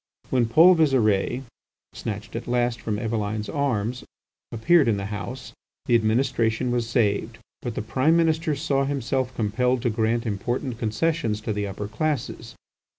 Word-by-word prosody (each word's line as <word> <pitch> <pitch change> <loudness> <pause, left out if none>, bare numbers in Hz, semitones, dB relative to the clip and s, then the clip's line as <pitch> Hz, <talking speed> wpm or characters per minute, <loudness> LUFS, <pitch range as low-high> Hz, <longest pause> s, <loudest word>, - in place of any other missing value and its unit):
When 125 -3 +2
Paul 165 +10 +7
Visire, 130 - +2 0.5
snatched 110 0 -6
at - - -5
last 120 -1 0
from 105 -2 -2
Eveline's 110 -1 -2
arms, 125 -4 -1 0.5
appeared 145 +6 +4
in 110 -3 +2
the 100 - -4
House, 105 +6 -6 0.3
the 120 - 0
administration 115 +1 +1
was 120 -2 -1
saved; 115 -1 0 0.2
but 120 -3 -4
the - - -3
Prime 130 +9 +2
Minister 160 -1 +1
saw 140 -2 0
himself 130 -2 -1
compelled 120 +3 0
to 120 - +1
grant 115 +2 0
important 120 +4 -3
concessions 115 0 0
to 110 - -2
the 105 0 -2
upper 100 +1 -5
classes. 140 +4 -3
120 Hz, 150 wpm, -24 LUFS, 110-135 Hz, 0.5 s, Paul